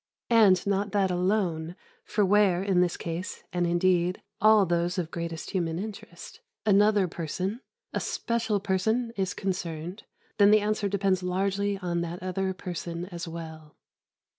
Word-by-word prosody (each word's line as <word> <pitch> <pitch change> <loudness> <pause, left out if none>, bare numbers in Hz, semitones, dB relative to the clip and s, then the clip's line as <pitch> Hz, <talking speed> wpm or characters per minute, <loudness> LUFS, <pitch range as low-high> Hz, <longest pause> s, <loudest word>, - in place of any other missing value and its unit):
And 205 -6 +5
not 200 0 0
that 195 -2 +2
alone, 180 -3 0 0.3
for 210 -1 +1
where, 190 -2 +3
as 200 - -4
in 180 -1 +4
this 175 -1 +1
case, 170 +3 -5
and, 175 -1 +1
indeed, 175 +1 +2 0.2
all 215 -1 +6
those 175 +1 0
of 170 -2 -2
greatest 170 -1 -5
human 165 -3 -1
interest, 210 - -8 0.3
another 205 -1 +4
person, 180 +7 -4 0.3
a - - 0
special 230 -3 -1
person, 220 +5 0
is 190 -1 -2
concerned, 180 -1 -4 0.3
then 200 0 +7
the 215 +1 +6
answer 210 -1 0
depends 195 -1 +1
largely 195 +2 0
on 175 -2 -2
that 170 +1 -5
other 190 +1 -1
person 175 -2 -5
as 170 -1 -5
well. 160 -2 -9
185 Hz, 150 wpm, -27 LUFS, 170-200 Hz, 0.3 s, then